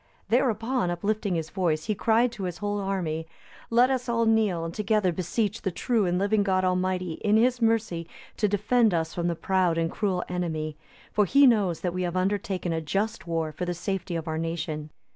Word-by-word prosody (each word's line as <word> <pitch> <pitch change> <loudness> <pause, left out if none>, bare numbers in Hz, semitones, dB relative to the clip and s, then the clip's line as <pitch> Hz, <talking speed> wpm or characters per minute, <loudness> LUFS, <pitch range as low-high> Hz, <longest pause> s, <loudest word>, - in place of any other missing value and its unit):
Thereupon, 240 -3 +1
uplifting 200 +2 -1
his 160 -1 -3
voice, 165 -5 0
he 215 - 0
cried 230 +4 +2
to 210 -5 -5
his 175 -2 -4
whole 205 +2 -2
army, 170 -5 -2 0.4
"Let 245 +3 +4
us 255 -2 -1
all 230 -1 +2
kneel, 215 -7 +2
and 165 - -5
together 210 -2 +1
beseech 200 +5 -2
the 190 - -1
true 220 +2 0
and 175 0 +1
living 205 +2 +2
God 190 -2 +1
Almighty 185 -2 -1
in 210 0 +4
His 245 +2 +2
mercy 220 -7 +1 0.3
to 210 - +2
defend 210 +1 +2
us 160 -1 -1
from 175 -1 -1
the 170 - 0
proud 180 -1 +1
and 165 0 0
cruel 190 -4 -1
enemy; 160 -4 -3 0.4
for 210 - +3
He 280 +8 +5
knows 205 -9 +3
that 175 -2 -1
we 185 - -2
have 180 0 -1
undertaken 190 -2 -1
a 160 - -1
just 205 +6 -2
war 165 -2 -1
for 180 - -4
the 175 0 -2
safety 185 0 -3
of 165 0 -4
our 160 0 -2
nation." 160 -2 -3
185 Hz, 200 wpm, -26 LUFS, 170-215 Hz, 0.4 s, He